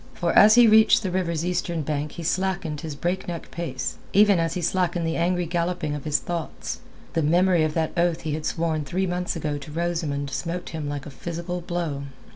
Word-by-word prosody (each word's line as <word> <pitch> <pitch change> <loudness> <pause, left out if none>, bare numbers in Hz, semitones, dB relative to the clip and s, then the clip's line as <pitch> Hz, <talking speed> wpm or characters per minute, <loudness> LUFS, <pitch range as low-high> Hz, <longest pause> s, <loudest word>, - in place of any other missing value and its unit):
For 170 -2 0
as 215 +1 +8
he 240 0 +8
reached 220 0 +6
the 190 - -1
river's 170 -3 -1
eastern 175 -2 -1
bank 150 0 -2
he 170 - -7
slackened 180 -3 -1
his 160 -3 -5
breakneck 175 +1 -3
pace, 135 -7 -4 0.2
even 205 -2 +6
as 165 -1 0
he 180 - -2
slackened 175 -1 +1
the 165 0 -1
angry 180 +1 +1
galloping 170 -2 -1
of 150 -1 -5
his 150 -1 +2
thoughts. 170 0 -4 0.3
The 165 - +1
memory 175 +2 +3
of 155 -1 -1
that 160 -1 0
oath 170 -1 +1
he 155 -2 -3
had 155 0 -2
sworn 160 -2 -1
three 180 +7 -1
months 180 0 -2
ago 150 -3 -2
to 145 +2 -10
Rosamund 155 -4 -2
smote 175 +5 -3
him 155 -3 -4
like 145 -1 -4
a 150 - -8
physical 170 +4 -5
blow. 170 -5 -3
170 Hz, 205 wpm, -25 LUFS, 155-180 Hz, 0.3 s, as